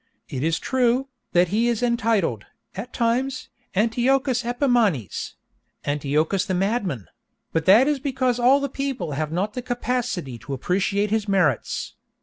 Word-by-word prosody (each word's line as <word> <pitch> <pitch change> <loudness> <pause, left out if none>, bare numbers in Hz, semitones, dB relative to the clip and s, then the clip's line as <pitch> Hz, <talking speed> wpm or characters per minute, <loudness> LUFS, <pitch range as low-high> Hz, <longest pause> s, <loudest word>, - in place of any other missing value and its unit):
It 130 - -4
is 160 +2 +1
true, 255 +3 +1 0.2
that 175 0 +4
he 225 +5 +2
is 235 0 0
entitled, 225 - +1 0.3
at 220 +6 -6
times, 255 +3 -1 0.3
Antiochus 250 +4 +2
Epimanes—Antiochus 180 - -1
the 185 - -1
madman—but 180 - -3
that 220 +8 +7
is 295 -2 +1
because 255 -3 0
all 275 +3 +4
people 270 - -3
have 155 +2 -2
not 195 +5 -1
the 250 - -4
capacity 245 - -2
to 135 +6 -7
appreciate 195 +8 0
his 220 -1 0
merits. 180 - 0
220 Hz, 130 wpm, -23 LUFS, 175-250 Hz, 0.3 s, that